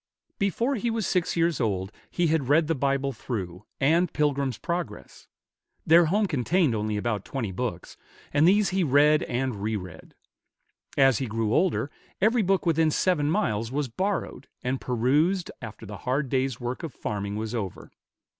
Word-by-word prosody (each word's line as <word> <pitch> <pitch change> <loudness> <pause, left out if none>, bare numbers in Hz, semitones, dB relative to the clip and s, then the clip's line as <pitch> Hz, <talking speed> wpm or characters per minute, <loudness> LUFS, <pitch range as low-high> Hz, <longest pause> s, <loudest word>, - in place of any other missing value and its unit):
Before 230 +7 +1
he 240 -1 -1
was 225 -3 -1
six 180 -1 0
years 165 -4 +1
old 95 -3 -1 0.2
he 175 - 0
had 155 -5 +1
read 155 +3 +5
the 165 - +1
Bible 140 -1 0
through, 100 -6 -5
and 165 +5 +3
"Pilgrim's 140 -5 0
Progress." 170 0 -5 0.6
Their 170 +2 +6
home 205 +6 +2
contained 160 -1 +1
only 105 -1 -1
about 105 -2 -2
twenty 120 -8 -4
books, 95 -3 -5 0.4
and 150 +3 +5
these 200 +2 +4
he 190 0 +1
read 150 +1 +4
and 125 -4 -2
re 110 +1 -1
read. 90 -5 -9 0.8
As 135 -4 +5
he 130 - -2
grew 110 0 -1
older, 170 -5 +1 0.3
every 225 +4 +3
book 195 -1 +1
within 160 -1 +3
seven 150 -2 +1
miles 115 - 0
was 140 -1 -1
borrowed, 185 - -3 0.2
and 130 +1 -1
perused 145 +10 +1
after 110 -1 -8
the 105 -1 -7
hard 130 +5 -1
day's 130 -2 0
work 120 +1 -4
of 160 -6 -6
farming 100 -1 -3
was 110 +1 -4
over. 105 -6 -5
135 Hz, 165 wpm, -26 LUFS, 115-170 Hz, 0.8 s, Their